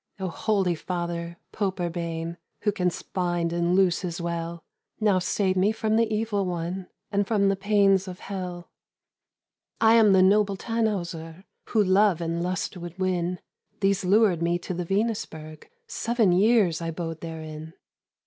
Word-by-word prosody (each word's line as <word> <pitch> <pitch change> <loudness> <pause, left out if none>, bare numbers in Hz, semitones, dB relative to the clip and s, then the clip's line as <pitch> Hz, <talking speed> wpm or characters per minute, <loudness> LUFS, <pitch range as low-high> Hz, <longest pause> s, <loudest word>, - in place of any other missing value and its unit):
"Oh, 190 -1 -2
holy 195 -1 0
Father, 170 0 -4
Pope 195 -3 -2
Urbain, 170 -1 -3 0.2
Who 210 - +2
canst 180 -4 -3
bind 175 -2 0
and 170 +1 +1
loose 185 -2 +3
as 175 -1 -4
well, 170 -1 -4 0.4
Now 205 -4 +3
save 185 +1 0
me 190 +3 +3
from 220 0 0
the 225 -1 +2
evil 215 -2 0
one, 180 +1 -3 0.2
And 200 -1 +1
from 200 -3 +2
the 195 - +2
pains 195 -1 +3
of 180 -1 -8
hell. 180 -3 -6 1.1
"I 225 0 +6
am 220 -3 +6
the 185 -1 +6
noble 200 0 +3
Tannhäuser, 185 -7 -3 0.2
Who 215 -3 +2
love 190 -1 +3
and 170 0 -2
lust 180 +2 -2
would 175 0 -8
win, 180 -1 -1 0.4
These 195 -1 +1
lured 195 -2 +3
me 170 +1 +1
to 175 - -6
the 175 0 -3
Venusberg, 165 -7 -3 0.2
Seven 230 -4 +1
years 190 -3 +3
I 165 - -2
bode 165 -1 -5
therein. 160 0 -7
185 Hz, 155 wpm, -26 LUFS, 170-200 Hz, 1.1 s, I